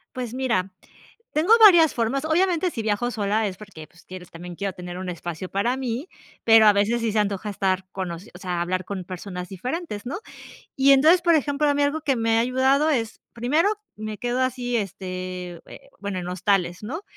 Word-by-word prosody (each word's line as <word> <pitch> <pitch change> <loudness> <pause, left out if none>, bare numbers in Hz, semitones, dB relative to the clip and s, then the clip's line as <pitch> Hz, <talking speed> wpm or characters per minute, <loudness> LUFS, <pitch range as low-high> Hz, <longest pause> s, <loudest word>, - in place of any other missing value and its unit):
Pues 245 -2 -4
mira, 205 -8 -1 0.6
tengo 325 +9 +4
varias 340 -7 +8
formas. 245 +5 -1
Obviamente, 350 +2 +1
si 230 - -4
viajo 220 +3 -1
sola 215 0 0
es 190 - -5
porque, 180 -7 -11
pues, 165 - -21
quieres 180 -1 -10
también, 175 +1 -9
quiero 195 +1 -3
tener 180 0 -8
un 185 - -6
espacio 175 +1 -6
para 235 +6 0
mí, 260 +6 -4 0.3
pero 225 -1 +7
a 210 - +7
veces 205 +4 +1
sí 230 -2 0
se 215 - +2
antoja 205 0 -1
estar 190 -2 -1
con 185 -2 -4
o 170 - -6
sea, 180 -2 -5
hablar 185 +1 -1
con 190 -2 -5
personas 180 0 -7
diferentes. 245 - -5
¿no? 260 - -4 0.6
Y 275 +1 +5
entonces, 315 +6 +6
por 340 -1 +4
ejemplo, 295 0 +1
a 285 - +2
mí 290 - +1
algo 285 +2 0
que 275 -4 +1
me 225 -1 +2
ha - - +4
ayudado 260 +5 +2
es, 230 -6 -2
primero, 265 - +2 0.3
me 215 0 -5
quedo 245 +3 -1
así, 250 -1 -1
este, 185 -3 -6
eh, - - -14
bueno, 200 -2 -4
en 180 0 -5
hostales, 180 -1 0
¿no? 300 - -5
215 Hz, 200 wpm, -24 LUFS, 185-265 Hz, 0.6 s, varias